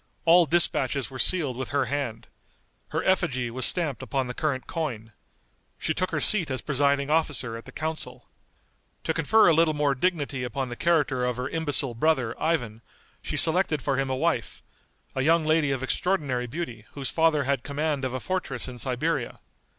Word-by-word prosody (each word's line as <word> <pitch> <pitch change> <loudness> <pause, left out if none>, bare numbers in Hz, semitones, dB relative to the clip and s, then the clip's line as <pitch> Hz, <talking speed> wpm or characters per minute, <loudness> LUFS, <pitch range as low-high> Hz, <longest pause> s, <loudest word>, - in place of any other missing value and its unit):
All 170 0 +6
dispatches 140 -7 +1
were 130 - -8
sealed 150 -8 +2
with 130 +1 -5
her 140 0 +1
hand. 125 -4 -3 0.6
Her - - -2
effigy 130 -11 +1
was 130 +2 +3
stamped 160 -7 0
upon 135 -2 -1
the 125 - -5
current 140 -2 -2
coin. 120 -10 -4 0.7
She 160 - -1
took 185 +3 -1
her - - -1
seat 190 -8 +3
as 130 -1 -3
presiding 140 0 +1
officer 145 -7 +1
at 115 - -9
the - - -11
council. 160 0 -5 0.8
To - - 0
confer 220 0 +4
a 170 - +6
little 160 -1 +3
more 145 -1 +2
dignity 140 -3 -1
upon 125 +2 -3
the 120 - -5
character 145 -5 +1
of 125 -1 -1
her 125 +1 -2
imbecile 145 -5 +1
brother, 125 -2 +1
Ivan, 120 -9 -1 0.4
she - - -3
selected 160 -2 +2
for 135 -2 0
him 135 0 0
a 130 - 0
wife, - - -1 0.5
a 130 - -1
young 160 +3 +3
lady 155 -2 +2
of 135 -1 -2
extraordinary 130 -5 -1
beauty 120 -6 -6
whose 140 -2 -3
father 160 -3 +3
had 135 -1 0
command 145 0 -2
of 130 -1 -2
a - - -2
fortress 155 -7 -3
in 125 -1 -8
Siberia. 125 0 -2
140 Hz, 180 wpm, -26 LUFS, 125-160 Hz, 0.8 s, All